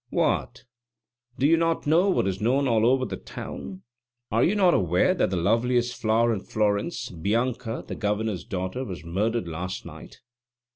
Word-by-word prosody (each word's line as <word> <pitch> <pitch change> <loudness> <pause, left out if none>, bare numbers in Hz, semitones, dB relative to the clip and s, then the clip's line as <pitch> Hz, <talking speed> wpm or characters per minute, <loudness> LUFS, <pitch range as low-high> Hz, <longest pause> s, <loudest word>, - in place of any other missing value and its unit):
"What, - - 0 0.7
do 135 - +1
you 165 +3 +5
not 165 0 0
know 170 +6 +4
what 185 - +2
is 95 0 -2
known 135 +5 +2
all 115 -2 +3
over 130 +1 +3
the - - -5
town? 95 0 -8 0.5
Are 115 +2 +3
you 195 - +2
not 185 -4 +4
aware 90 - +3
that 185 - +1
the 95 - -2
loveliest 120 +6 +1
flower 115 +1 +3
in 105 - -2
Florence, 110 - -1
Bianca, 115 +6 -2
the - - -5
Governor's 105 -2 -2
daughter, 95 +7 -4
was 95 -8 -7
murdered 105 +4 -1
last 90 +3 -5
night? - - -12
115 Hz, 165 wpm, -25 LUFS, 95-130 Hz, 0.7 s, you